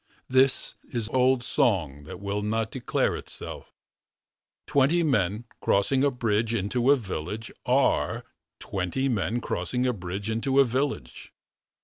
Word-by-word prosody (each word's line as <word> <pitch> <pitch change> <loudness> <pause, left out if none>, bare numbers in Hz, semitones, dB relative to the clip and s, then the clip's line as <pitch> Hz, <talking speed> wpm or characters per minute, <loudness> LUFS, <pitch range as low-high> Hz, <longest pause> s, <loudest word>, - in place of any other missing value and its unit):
This 130 +1 +3 0.2
is 115 -3 -2
old 130 0 +3
song 90 - +1
That 85 - -8
will 100 +1 -2
not 110 +1 -1
declare 130 -3 0
itself... - - -8 0.9
Twenty 145 +5 +3
men 110 - +1 0.2
crossing 130 +7 +2
a 145 - +5
bridge. 115 -2 0
Into 120 +5 0
a 145 - +8
village. 105 - -5 0.2
Are 130 +2 +2 0.3
Twenty 95 +8 -2
men 120 0 0
crossing 125 +1 -1
a 125 - +2
bridge 95 +1 -5
Into 115 +5 +1
a 140 - +7
village. 125 - -3
115 Hz, 130 wpm, -27 LUFS, 100-130 Hz, 0.9 s, a